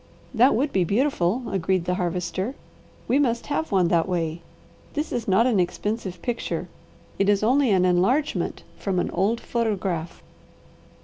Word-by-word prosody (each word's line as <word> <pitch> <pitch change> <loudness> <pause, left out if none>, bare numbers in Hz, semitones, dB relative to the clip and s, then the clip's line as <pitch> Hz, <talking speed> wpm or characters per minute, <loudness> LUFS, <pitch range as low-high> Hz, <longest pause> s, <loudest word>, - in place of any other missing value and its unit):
"That 250 +3 +5
would 280 +4 0
be 185 - +3
beautiful," 220 - +1
agreed 185 -1 0
the 180 - 0
Harvester. 180 +5 -2 0.5
"We 270 - +3
must 235 -5 +1
have 320 - -2
one 185 -3 +3
that 170 +1 +2
way. 170 -2 -2 0.5
This 300 +1 -2
is 235 -2 -3
not 195 +4 +4
an 235 -6 +2
expensive 185 0 -2
picture. 240 -1 -3 0.5
It 195 +1 +3
is 205 0 +3
only 260 +3 +3
an 185 -3 +3
enlargement 195 +12 +1 0.2
from 195 -2 -1
an 180 - 0
old 205 +6 +1
photograph." 195 -9 -2
195 Hz, 150 wpm, -24 LUFS, 180-240 Hz, 0.5 s, That